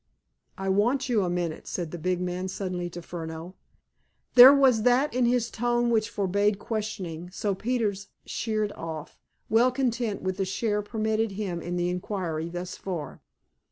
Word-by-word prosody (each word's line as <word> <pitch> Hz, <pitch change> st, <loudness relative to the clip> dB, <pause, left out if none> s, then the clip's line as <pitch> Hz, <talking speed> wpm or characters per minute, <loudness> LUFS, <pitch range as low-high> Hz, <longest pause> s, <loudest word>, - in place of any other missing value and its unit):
"I 195 Hz, -, -4 dB
want 240 Hz, +8 st, +2 dB
you 225 Hz, -4 st, +3 dB
a 180 Hz, -, -1 dB
minute," 175 Hz, -2 st, -3 dB
said 170 Hz, -4 st, -4 dB
the 175 Hz, -, -6 dB
big 180 Hz, +2 st, 0 dB
man 180 Hz, +1 st, -2 dB
suddenly 180 Hz, -2 st, -3 dB
to 175 Hz, 0 st, -8 dB
Furneaux. 165 Hz, +1 st, -7 dB, 0.8 s
There 250 Hz, +2 st, +11 dB
was 265 Hz, -5 st, +5 dB
that 250 Hz, +5 st, +3 dB
in 250 Hz, 0 st, +2 dB
his 240 Hz, -1 st, +1 dB
tone 240 Hz, +1 st, +1 dB
which 220 Hz, -1 st, +2 dB
forbade 200 Hz, 0 st, +1 dB
questioning, 190 Hz, -7 st, -4 dB
so 200 Hz, +2 st, -2 dB
Peters 210 Hz, -2 st, -1 dB, 0.2 s
sheered 215 Hz, -2 st, -1 dB
off, 160 Hz, -3 st, -7 dB, 0.3 s
well 235 Hz, +3 st, +4 dB
content 240 Hz, -5 st, -1 dB
with 185 Hz, 0 st, -2 dB
the 195 Hz, -, 0 dB
share 210 Hz, +2 st, -1 dB
permitted 220 Hz, 0 st, -1 dB
him 190 Hz, -4 st, -3 dB
in 175 Hz, +1 st, -4 dB
the 175 Hz, 0 st, 0 dB
inquiry 180 Hz, -3 st, -3 dB
thus 175 Hz, +1 st, -5 dB
far. 175 Hz, -6 st, -6 dB
200 Hz, 160 wpm, -27 LUFS, 180-230 Hz, 0.8 s, There